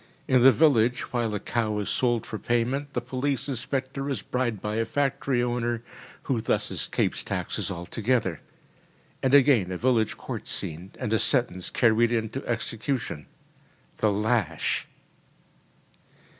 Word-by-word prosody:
In 130 -1 +4
the 135 +2 +9
village, 125 -6 +3
while 115 -3 0
a - - -1
cow 110 0 -1
is 105 - -2
sold 120 -3 +1
for 110 - -5
payment, 130 +4 -1
the 125 - -1
police 130 +1 -2
inspector 135 +1 -3
is 130 -8 -2
bribed 120 -4 -1
by 105 +2 -3
a 115 - +2
factory 135 -2 0
owner, 120 -1 -1 0.4
who 125 -5 0
thus - - 0
escapes - - -1
taxes - - -3
altogether. 95 - -1 0.8
And 135 +1 +4
again 125 -10 +5
a 90 - -2
village 115 -1 +1
court - - -6
scene, 85 +4 -3
and 110 - -2
a 110 - +3
sentence 120 -9 +1
carried 120 0 +3
into 115 +3 -2
execution 115 - -3 0.7
the 110 - +2
lash! 105 -6 0
120 Hz, 140 wpm, -26 LUFS, 110-130 Hz, 0.8 s, the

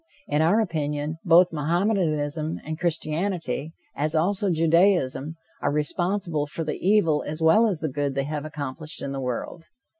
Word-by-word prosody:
In 150 +1 +1
our 175 +8 +4
opinion, 155 -5 -2
both 175 0 +6
Mohammedanism 160 -2 0
and 155 +1 -5
Christianity, 165 -2 -2 0.2
as 155 +2 -1
also 195 +5 +2
Judaism, 165 -3 +2 0.3
are 145 - +1
responsible 165 +1 -1
for 165 +3 -4
the 155 - -4
evil 175 -6 +3
as 155 +2 -4
well 165 +8 +5
as 185 -7 -2
the 160 - 0
good 140 -1 -2
they 135 - 0
have 150 +1 -4
accomplished 150 0 -6
in 140 - -3
the 135 -1 -4
world. 130 +6 -4
155 Hz, 155 wpm, -25 LUFS, 150-175 Hz, 0.3 s, both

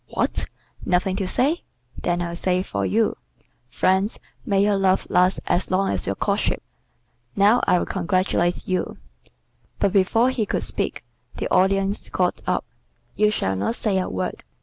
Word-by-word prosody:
"What! - - 0 0.4
nothing 185 +1 +1
to 195 -2 -1
say? 285 - +1 0.3
Then 175 0 -1
I'll 170 0 -4
say 180 +1 +1
it - - -6
for 100 -1 -3
you. 90 - +1 0.5
'Friends, 190 - +1 0.3
may 200 -2 +3
your 205 0 +3
love 195 -1 +2
last 180 +1 +3
as 175 +1 0
long 190 +1 +1
as 95 -2 -2
your 100 - 0
courtship.' - - 0 0.7
Now 205 +5 +5
I'll 180 - +3
congratulate 185 -1 0
you." 185 -2 -1 0.8
But 195 - +1
before 225 +6 +3
he 225 -5 -1
could - - -1
speak, - - -3 0.3
the - - -2
Audience 195 +2 +2
got - - 0
up. - - 0 0.5
"You 210 0 +4
shall 95 - -1
not 100 - -1
say 200 -5 0
a 185 - -2
word. 95 0 -4
190 Hz, 160 wpm, -23 LUFS, 180-200 Hz, 0.8 s, Now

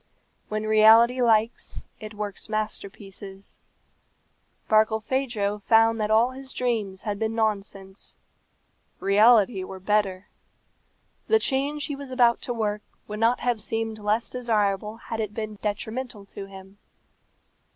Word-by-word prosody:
When 215 0 -2
reality 220 +3 +6
likes, 225 -1 +1
it 215 -1 -9
works 205 0 -5
masterpieces. 200 -2 -6 1.1
Barkilphedro 220 -1 +1
found 225 +2 +4
that 210 - 0
all 225 +3 +4
his 265 0 -9
dreams 215 -6 -2
had 205 -2 -3
been 225 0 -1
nonsense; 200 -3 -3 0.8
reality 210 0 +4
were 190 0 -8
better. 195 -1 0 1.0
The 445 - +5
change 285 -4 -1
he 290 - -4
was 280 -1 -9
about 245 -2 +3
to - - -4
work 210 -3 -1 0.3
would 210 0 -6
not 230 +2 +2
have 240 -3 0
seemed 225 +1 -3
less 210 +2 0
desirable 215 -3 -1
had 225 0 -6
it 215 -1 -3
been 215 -2 -5
detrimental 220 +1 -4
to 195 - -7
him. 195 +1 -13
215 Hz, 125 wpm, -25 LUFS, 205-235 Hz, 1.1 s, reality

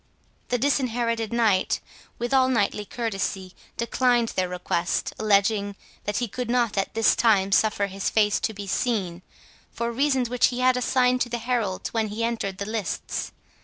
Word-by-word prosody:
The 245 - 0
Disinherited 235 -4 0
Knight, 220 -5 +2 0.4
with 240 +2 -3
all 260 -1 +4
knightly 210 -3 0
courtesy, 195 -5 -3 0.2
declined 240 0 +2
their 185 -1 -1
request, 180 -1 -1
alleging, 200 -1 +2 0.3
that 205 0 -1
he 240 - 0
could 245 +2 -5
not 240 -3 +1
at 195 +1 -2
this 225 0 +4
time 205 -4 +3
suffer 205 0 +3
his 195 0 -3
face 210 -2 +2
to - - -1
be 205 -1 -7
seen, 190 -5 -1 0.5
for 235 0 -3
reasons 265 0 +1
which 245 +1 +3
he 250 0 -3
had 255 0 +4
assigned 250 0 +2
to 240 - 0
the 240 - -2
heralds 230 -5 -2
when 225 -1 0
he 215 +2 -4
entered 225 -5 -2
the 200 - -4
lists. 215 -3 -3
225 Hz, 165 wpm, -25 LUFS, 200-245 Hz, 0.5 s, all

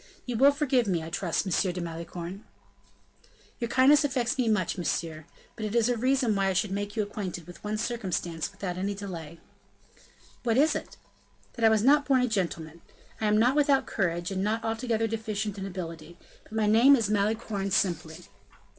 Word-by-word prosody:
You 245 - -3
will 270 +5 +6
forgive 270 -5 +1
me, 175 -4 0
I 160 - -8
trust, 180 -1 -1
M. 185 0 +1
de 180 - -5
Malicorne." 170 +3 -6 1.2
"Your 235 - -1
kindness 275 +4 +5
affects 255 -4 0
me 250 -4 +1
much, 185 -6 +1
monsieur: 165 -3 -3 0.3
but 220 - -7
it 215 +1 -3
is 235 0 +3
a 245 - +2
reason 255 -1 +1
why 195 -1 +1
I 190 - +1
should 190 +2 0
make 205 +1 -3
you 215 - +1
acquainted 190 -5 -5
with 175 - -13
one 210 +1 -2
circumstance 185 -9 -3
without 190 -3 -5
any 200 +2 -2
delay." 170 -5 -7 1.0
"What 235 -1 +1
is 300 +4 +4
it?" - - -6 0.6
"That 230 - 0
I - - +8
was 220 -1 +2
not 285 +3 +4
born 265 -3 +4
a 250 - +2
gentleman. 170 -6 -3 0.4
I 215 - +1
am 210 0 +3
not 245 +5 +3
without 285 -2 +3
courage, 175 0 -1
and 190 0 -1
not 220 +2 -1
altogether 225 0 -1
deficient 215 -2 -3
in 195 - -4
ability; 170 -3 -7 0.3
but - - -16
my 220 -1 +1
name 235 +7 +6
is 230 -6 0
Malicorne 205 -1 0
simply." 170 -4 -1
210 Hz, 190 wpm, -28 LUFS, 180-235 Hz, 1.2 s, I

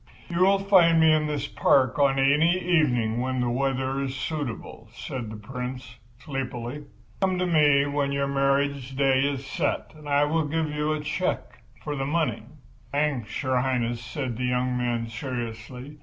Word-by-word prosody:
"You 170 0 -2
will 195 +2 +5
find 185 -4 +5
me 160 -1 +6
in 155 -1 +2
this 145 -2 -2
park 130 -2 +2
on 140 -1 +3
any 150 +6 +4
evening 125 -11 +1
when 130 0 -1
the 120 -1 0
weather 135 +1 -1
is 135 -1 -3
suitable," 130 -6 -5
said 125 -4 -5
the 110 - -7
Prince, 125 +2 -7 0.2
sleepily. 135 0 -5 0.3
"Come 190 -2 +1
to 180 - 0
me 150 -5 +4
when 140 -1 -1
your 140 0 0
marriage 140 -1 0
day 135 -1 +3
is 140 0 -1
set 135 - -2
and 150 -1 -11
I 145 0 +4
will 155 +1 +1
give 155 0 -1
you 150 +1 -1
a 155 -1 -1
cheque 155 +5 -3 0.2
for 150 -1 -3
the 135 -1 -2
money." 145 -8 0 0.5
"Thanks, 140 -7 -1
Your 130 -1 +1
Highness," 120 -2 -1
said 125 0 -4
the 125 - -2
young 125 0 0
man, 120 -2 -1
seriously. 125 +3 -6
135 Hz, 170 wpm, -26 LUFS, 125-150 Hz, 0.5 s, me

